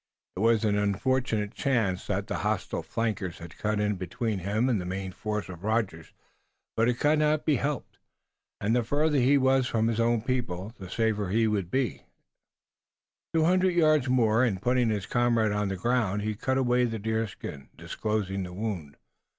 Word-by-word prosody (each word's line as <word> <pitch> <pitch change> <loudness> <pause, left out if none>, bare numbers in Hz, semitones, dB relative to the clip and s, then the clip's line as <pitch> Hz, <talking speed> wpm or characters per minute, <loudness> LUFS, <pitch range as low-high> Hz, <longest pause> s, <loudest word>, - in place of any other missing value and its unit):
It - - -5
was 115 +1 +3
an 105 -1 +2
unfortunate 105 +1 0
chance 110 -9 0
that - - -1
the - - -3
hostile - - -1
flankers 105 -6 -3
had 85 0 -11
cut 105 -1 0
in 105 -1 0
between 100 +4 -3
him 105 +7 0
and 115 -7 +1
the - - -5
main 95 +1 -4
force 105 +2 -3
of 90 -1 -10
Rogers, 105 -7 -1 0.6
but 115 +2 +3
it 120 - -1
could 150 +1 +3
not 150 0 +2
be 150 -4 +3
helped, 145 +2 -3 0.6
and 110 +4 +1
the 120 - +2
farther 145 +4 +1
he 135 +3 +4
was 130 -1 +3
from 115 0 +1
his 115 -1 -1
own 115 -1 +2
people 115 -6 -2
the 95 -2 -8
safer 110 0 0
would 95 - -4
he 115 +1 +3
and 110 -1 +2
Tayoga 95 -4 -2
be. 130 +1 -1 1.3
Two 160 - +4
hundred 185 +1 +3
yards 155 -6 +3
more 120 -2 +3
and 105 -7 +1
putting 125 +2 +2
his 105 -3 -1
comrade 120 -3 +2
on 105 0 0
the 95 -1 -3
ground 105 -1 0
he 110 0 -1
cut 130 +5 -1
away 125 -1 +3
the 115 -2 -2
deerskin, 110 -10 -4
disclosing 105 -3 -2
the 90 -1 -6
wound. 90 -8 -4
110 Hz, 190 wpm, -28 LUFS, 100-125 Hz, 1.3 s, he